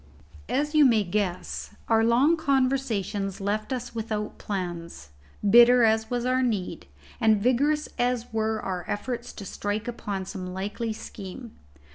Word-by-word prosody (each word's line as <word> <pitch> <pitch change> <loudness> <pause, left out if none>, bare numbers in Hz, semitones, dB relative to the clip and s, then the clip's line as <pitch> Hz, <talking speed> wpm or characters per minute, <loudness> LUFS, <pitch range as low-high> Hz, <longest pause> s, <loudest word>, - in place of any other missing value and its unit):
As 295 +2 0
you 305 -1 +6
may 230 -6 +5
guess, 185 -1 -3
our 225 -1 +4
long 250 +8 +4
conversations 255 - 0
left 210 +4 -2
us 250 -2 -4
without 215 -2 -4
plans, 170 - -5 0.4
bitter 240 +3 +7
as 220 0 +3
was 245 -1 -1
our 255 +1 +2
need, 210 - -2 0.3
and 220 -2 +4
vigorous 280 +7 +2
as 245 -1 0
were 220 0 0
our 185 -3 -3
efforts 240 +3 -3
to 200 - -8
strike 205 +4 -3
upon 200 -5 -4
some 185 -2 -6
likely 205 +4 -3
scheme. 215 +2 -8
220 Hz, 140 wpm, -26 LUFS, 200-245 Hz, 0.4 s, bitter